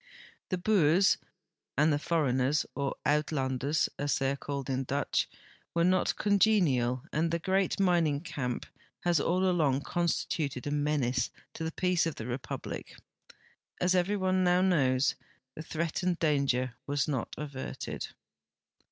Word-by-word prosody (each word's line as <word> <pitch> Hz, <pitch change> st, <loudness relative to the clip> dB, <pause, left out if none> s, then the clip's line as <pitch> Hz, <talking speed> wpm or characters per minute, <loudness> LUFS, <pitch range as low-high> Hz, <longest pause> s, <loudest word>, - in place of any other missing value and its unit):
The 185 Hz, -, 0 dB
Boers 180 Hz, -2 st, +4 dB, 0.6 s
and 150 Hz, +2 st, +4 dB
the 145 Hz, -, +1 dB
foreigners, 145 Hz, -3 st, +1 dB
or 140 Hz, -1 st, -2 dB
" -, -, -53 dB
Uitlanders," 145 Hz, -1 st, +1 dB
as 145 Hz, -1 st, +1 dB
they 135 Hz, 0 st, +1 dB
are -, -, -1 dB
called 140 Hz, -1 st, -5 dB
in 135 Hz, 0 st, -1 dB
Dutch, 140 Hz, +2 st, 0 dB, 0.5 s
Avere 170 Hz, 0 st, +3 dB
not 185 Hz, 0 st, +2 dB
congenial 170 Hz, -, +3 dB
and 165 Hz, +2 st, +1 dB
the 170 Hz, -, 0 dB
great 190 Hz, +3 st, 0 dB
mining 170 Hz, -6 st, +2 dB
camp 125 Hz, -7 st, -3 dB, 0.4 s
has 175 Hz, -3 st, +2 dB
all 185 Hz, +5 st, +1 dB
along 150 Hz, -7 st, +2 dB
con 170 Hz, +5 st, -1 dB
stituted 140 Hz, -6 st, -2 dB
a 145 Hz, -, -2 dB
menace 145 Hz, -4 st, +1 dB, 0.2 s
to 165 Hz, -, -5 dB
the 160 Hz, -, -2 dB
peace 180 Hz, -1 st, +1 dB
of 165 Hz, -, -3 dB
the 110 Hz, -, -6 dB
Republic. 125 Hz, +2 st, -5 dB, 0.8 s
As 180 Hz, +1 st, +2 dB
every 185 Hz, +3 st, +2 dB
one 185 Hz, -1 st, +1 dB
now 180 Hz, 0 st, +4 dB
knows, 140 Hz, -8 st, +3 dB, 0.4 s
the -, -, -7 dB
threatened 170 Hz, +3 st, -1 dB
danger 140 Hz, -6 st, +1 dB
was 145 Hz, -2 st, 0 dB
not 135 Hz, -5 st, -2 dB
averted. 140 Hz, -3 st, -5 dB
150 Hz, 145 wpm, -30 LUFS, 135-175 Hz, 0.8 s, Boers